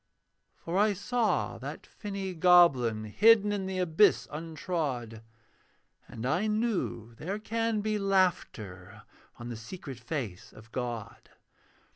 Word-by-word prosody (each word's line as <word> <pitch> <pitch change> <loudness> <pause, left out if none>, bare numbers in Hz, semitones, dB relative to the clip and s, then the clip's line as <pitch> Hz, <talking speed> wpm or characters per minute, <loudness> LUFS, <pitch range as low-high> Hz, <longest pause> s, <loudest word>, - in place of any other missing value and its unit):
For 175 +3 -2
I 210 0 +4
saw 225 +3 0
that - - -7
finny 195 -3 -5
goblin 160 -11 +5
Hidden 210 - +5
in 195 -2 -2
the 190 0 -3
abyss 180 +3 +3
untrod; 150 -7 -4 0.9
And 115 +1 -7
I 165 +11 +1
knew 210 - -1
there 185 - -4
can 225 0 -1
be 215 0 -1
laughter 110 - -1 0.3
On 120 0 -7
the 120 - -5
secret 130 +2 -8
face 120 - -5
of 110 +1 -15
God. 120 -4 -5
170 Hz, 120 wpm, -29 LUFS, -, 0.9 s, goblin